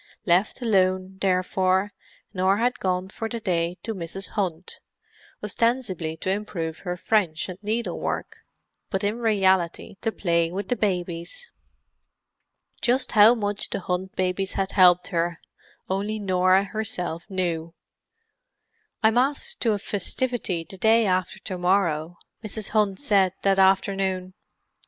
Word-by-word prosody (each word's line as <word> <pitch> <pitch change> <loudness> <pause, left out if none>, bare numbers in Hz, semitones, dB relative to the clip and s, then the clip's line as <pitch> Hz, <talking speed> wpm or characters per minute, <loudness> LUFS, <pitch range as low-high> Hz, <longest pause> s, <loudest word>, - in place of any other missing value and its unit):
Left 190 +7 +2
alone, 185 -3 +1
therefore, 190 +1 +1 0.4
Norah 190 +1 +2
had 245 +3 0
gone 185 0 -1
for 225 +3 -5
the 235 - -4
day 175 -3 -1
to 225 - -3
Mrs. 190 +1 -5
Hunt, 185 -4 -3 0.6
ostensibly 210 -8 -1
to 185 - -2
improve 185 -6 -3
her 180 -1 -4
French 180 -5 +1
and 185 -1 -8
needlework, 220 +3 -3 0.5
but 195 -1 -2
in 210 +3 -1
reality 190 -5 +1
to 225 - 0
play 170 -5 +1
with 190 +1 -4
the 245 - +2
babies. 180 - -3 1.3
Just 255 +2 +1
how 220 +2 +7
much 205 -2 -1
the - - -3
Hunt 185 +1 -3
babies 185 +1 -1
had 195 0 -1
helped 180 -2 +5
her 170 -1 -1 0.5
only 200 +3 -1
Norah 185 -1 +3
herself 195 -5 -4
knew. 170 -3 -2 1.3
"I'm 220 +2 +5
asked 290 - 0
to 225 -3 +3
a - - 0
festivity 205 -3 -2
the 190 - -9
day 225 +2 +4
after 185 -1 0
to 185 -3 -5
morrow," 175 -3 +1 0.3
Mrs. 215 0 -3
Hunt 210 -3 +1
said 195 -9 +3
that 195 -1 +3
afternoon. 190 -1 +2
190 Hz, 135 wpm, -25 LUFS, 180-215 Hz, 1.3 s, how